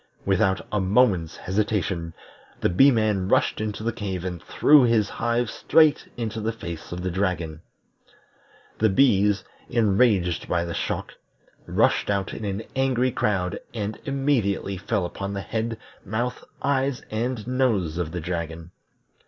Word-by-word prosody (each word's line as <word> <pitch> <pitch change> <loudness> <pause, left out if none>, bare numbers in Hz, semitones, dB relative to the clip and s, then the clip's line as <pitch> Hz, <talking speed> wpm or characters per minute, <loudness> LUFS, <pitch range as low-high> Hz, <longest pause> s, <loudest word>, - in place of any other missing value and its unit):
Without 95 0 +2
a 105 - +1
moment's 95 -5 +2
hesitation, 95 -4 -1 0.4
the - - +2
Bee 115 +11 +6
man 110 -6 +1
rushed - - +2
into 110 0 -3
the 115 0 -1
cave 95 -5 -4
and 90 -3 -4
threw 150 +9 +5
his 115 -4 +3
hive 120 0 0
straight 155 +6 +3
into 110 -2 -3
the 110 +1 0
face 85 -8 -8
of 90 0 -5
the 95 - -1
dragon. 85 -4 -2 1.2
The 110 - +4
bees, 100 -3 +3 0.3
enraged 105 -6 +2
by 85 -1 +1
the 85 - -4
shock, - - -3 0.5
rushed - - +2
out 100 -1 -1
in 110 - -5
an 100 +2 -3
angry 130 -1 +2
crowd 95 -6 -1 0.2
and 105 -1 -3
immediately 135 -9 0
fell 100 +1 -1
upon 100 +3 -5
the 100 - -3
head, 115 +2 -3 0.3
mouth, 115 +5 -3 0.2
eyes, 135 -1 0
and 115 0 -2
nose 115 -10 0
of 85 -2 -2
the 90 - -3
dragon. 85 0 -5
105 Hz, 145 wpm, -24 LUFS, 90-115 Hz, 1.2 s, Bee